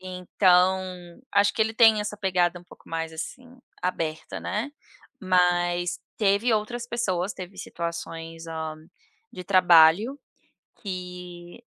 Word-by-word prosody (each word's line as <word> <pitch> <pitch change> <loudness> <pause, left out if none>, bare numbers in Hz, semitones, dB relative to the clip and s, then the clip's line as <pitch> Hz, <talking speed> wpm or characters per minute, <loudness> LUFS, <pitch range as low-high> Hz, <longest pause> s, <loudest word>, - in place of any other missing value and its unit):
Então, 185 0 +2 0.5
acho 200 0 +4
que - - -5
ele 220 - -1
tem 225 -2 +6
essa 210 0 -4
pegada 180 -3 +1
um 175 - -18
pouco - - -18
mais 165 0 -3
assim 250 +10 -8 0.2
aberta, 160 -3 -3
né, 220 +9 -3 0.5
mas 175 -2 +1 0.2
teve 205 +3 +2
outras 225 +3 -1
pessoas, 205 -6 -2
teve 185 +1 -9
situações, 165 -1 -6
hã, 160 -1 -5 0.6
de 180 - -8
trabalho, 185 - +5 0.6
que, 180 0 -8
180 Hz, 115 wpm, -25 LUFS, 175-210 Hz, 0.6 s, tem